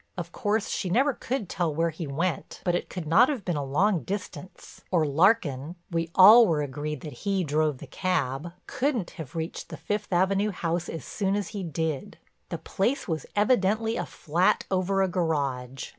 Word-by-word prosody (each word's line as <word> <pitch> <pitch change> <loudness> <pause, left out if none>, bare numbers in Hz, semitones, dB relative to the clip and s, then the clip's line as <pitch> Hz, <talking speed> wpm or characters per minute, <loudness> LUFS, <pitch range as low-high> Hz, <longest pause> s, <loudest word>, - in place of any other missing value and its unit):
Of 170 -1 -5
course 210 +3 0
she 185 - -2
never 265 +9 +3
could 245 -4 -3
tell 165 -3 -1
where 165 +1 +1
he 160 0 -6
went 160 +3 -3
but 175 - +1
it 175 - -2
could 180 -4 -5
not 205 - +5
have 260 -10 -3
been 175 - -1
a 145 - -1
long 170 +7 +2
distance, 185 +2 -7
or 170 -4 +2
Larkin—we 165 - +1
all 220 +5 +9
were 155 -4 +1
agreed 145 +1 -4
that 150 - -7
he 195 -2 0
drove 150 -2 +1
the 155 - -9
cab—couldn't 180 - -2
have 150 -3 -9
reached 165 0 -4
the - - -7
Fifth 210 0 -3
Avenue 195 +3 +2
house 175 -2 -2
as 165 - -6
soon 195 -1 -1
as 205 -1 -2
he 205 -2 -5
did. 160 -4 -3 0.3
The - - -3
place 235 +8 -1
was 160 -5 -3
evidently 220 0 +2
a - - -3
flat 170 +4 +1
over 195 +1 +1
a - - +2
garage. 140 -8 -2
175 Hz, 180 wpm, -27 LUFS, 155-200 Hz, 0.3 s, all